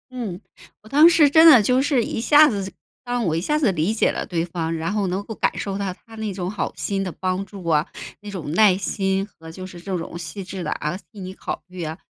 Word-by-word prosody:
嗯， 215 -7 -5 0.4
我 215 - -15
当 295 +5 +7
时 325 -4 +5
真 320 +3 +7
的 255 -7 +8
就 250 +5 +3
是 270 -4 +2
一 - - -4
下 295 +5 +6
子 195 -4 -4 0.3
让 245 -1 -1
我 160 - 0
一 160 - 0
下 300 - 0
子 270 -9 +2
理 175 +4 0
解 225 - +2
了 - - -4
对 170 -2 -2
方， 165 -1 -3
然 165 +3 -2
后 205 -2 0
能 185 +3 -2
够 220 - -7
感 - - 0
受 195 -1 -3
到 195 -2 -3
他 225 +4 -17
那 220 -2 -4
种 185 -1 -4
好 210 - -3
心 195 -1 -2
的 190 - -2
帮 185 +1 -2
助 195 -3 -11
啊， 155 -2 +2 0.3
那 210 - -10
种 175 -7 -5
耐 195 +2 +5
心 195 0 -1
和 165 -5 -14
就 185 +3 -8
是 185 -2 -10
这 185 +1 -3
种 165 0 -6
细 170 +4 -6
致 185 -1 -6
地， 150 - -2
啊， 150 +4 -3 0.2
替 205 - -10
你 185 0 -6
考 - - -6
虑 180 -1 -7
啊， 160 +1 -5
195 Hz, 275 characters per minute, -22 LUFS, 175-220 Hz, 0.4 s, 的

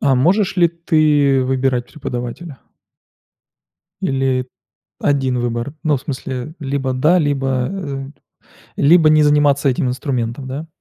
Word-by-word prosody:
А 135 -1 +3
можешь 185 +9 +2
ли 170 -1 +4
ты 150 -5 +2
выбирать 130 -1 0
преподавателя? 130 +1 -6 1.4
Или 135 -1 0 0.5
1 135 -3 0
выбор? 120 +3 -3
Ну, 150 -3 +2
в - - -11
смысле, 135 0 -5
либо 135 -2 -2
да, 155 +8 +3
либо, 135 -4 0
э, 140 -8 -5 0.7
либо 160 +2 +5
не 155 0 +5
заниматься 145 -1 +3
этим 130 0 0
инструментом, 125 -1 -3
да. 145 +5 -5
135 Hz, 120 wpm, -18 LUFS, 130-150 Hz, 1.4 s, либо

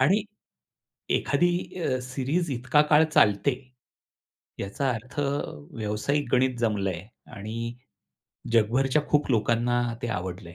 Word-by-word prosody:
आणि 190 +11 +4 1.0
एखादी 175 0 +2 0.3
अ, 130 -3 0
सीरीज 135 +6 -1
इतका 130 +4 +3
काळ 150 +1 +7
चालते, 105 +4 +4 1.1
याचा 130 +8 -1
अर्थ 125 +4 -5 0.6
व्यावसायिक 115 +7 -1
गणित 130 0 +3
जमलंय 100 -6 -1 0.3
आणि 115 +3 -5 0.8
जगभरच्या 130 +6 +3
खूप 150 -1 +2
लोकांना 120 +1 +2 0.2
ते 120 - -2
आवडलंय. 90 -3 -6
120 Hz, 100 wpm, -26 LUFS, 105-135 Hz, 1.1 s, काळ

